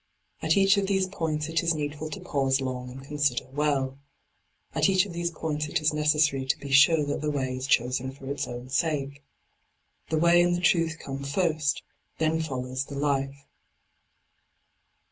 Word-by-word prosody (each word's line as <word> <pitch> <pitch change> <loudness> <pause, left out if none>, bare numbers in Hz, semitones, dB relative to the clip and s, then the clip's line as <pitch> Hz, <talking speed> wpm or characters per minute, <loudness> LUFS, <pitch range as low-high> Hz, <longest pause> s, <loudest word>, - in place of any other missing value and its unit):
At - - +2
each 195 +1 +5
of 200 -1 +1
these 190 -1 +2
points 160 -5 -2
it 165 0 0
is 170 -1 +1
needful 150 +1 -4
to 155 - -6
pause 135 -1 0
long 130 -1 -4
and 130 +2 -10
consider 145 -3 0
well. 135 -2 0 0.7
At - - +3
each 190 0 +4
of 190 - -8
these 170 0 -1
points 155 -2 -3
it - - 0
is 155 0 +2
necesssary 150 -3 +2
to - - +2
be 140 - -8
sure 150 +2 +6
that 145 - -3
the 150 - -1
way 130 -3 -2
is 130 +1 -4
chosen 125 +1 +1
for 135 0 -13
its 140 +1 -3
own 120 +1 -7
sake. 140 -1 -1 0.9
The 160 - +1
way 170 +2 +5
and 175 0 +2
the - - -2
truth 165 -2 +2
come 135 -3 -6
first, 155 0 0 0.3
then 160 0 +1
follows 130 -3 -3
the 140 - -8
life. 140 -1 -1
150 Hz, 180 wpm, -27 LUFS, 135-160 Hz, 0.9 s, sure